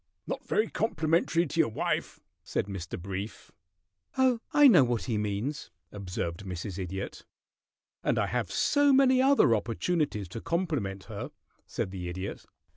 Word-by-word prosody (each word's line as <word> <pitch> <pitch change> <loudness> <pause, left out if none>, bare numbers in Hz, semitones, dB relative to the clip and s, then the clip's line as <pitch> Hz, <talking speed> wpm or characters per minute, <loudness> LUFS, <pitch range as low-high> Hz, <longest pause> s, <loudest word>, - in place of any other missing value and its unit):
"Not - - -4
very 215 - +2
complimentary 170 -4 +1
to 165 +2 -4
your 160 - +4
wife," 110 - -2 0.2
said - - -1
Mr. 95 -5 -6
Brief. 95 +4 -6 0.7
"Oh, 260 -3 +3
I 295 -1 +7
know 185 - +7
what 120 -2 0
he 120 - -2
means," 105 +8 -3 0.2
observed 90 -3 -4
Mrs. 90 0 -5
Idiot. 95 +1 -5 0.8
"And - - +1
I - - +2
have - - -2
so 285 -1 +3
many 260 -1 +5
other 270 - +5
opportunities 115 - -1
to 110 - -6
compliment 145 - -2
her," - - -6 0.4
said 95 - -3
the 90 -2 -5
Idiot. 95 +3 -6
115 Hz, 145 wpm, -29 LUFS, -, 0.8 s, I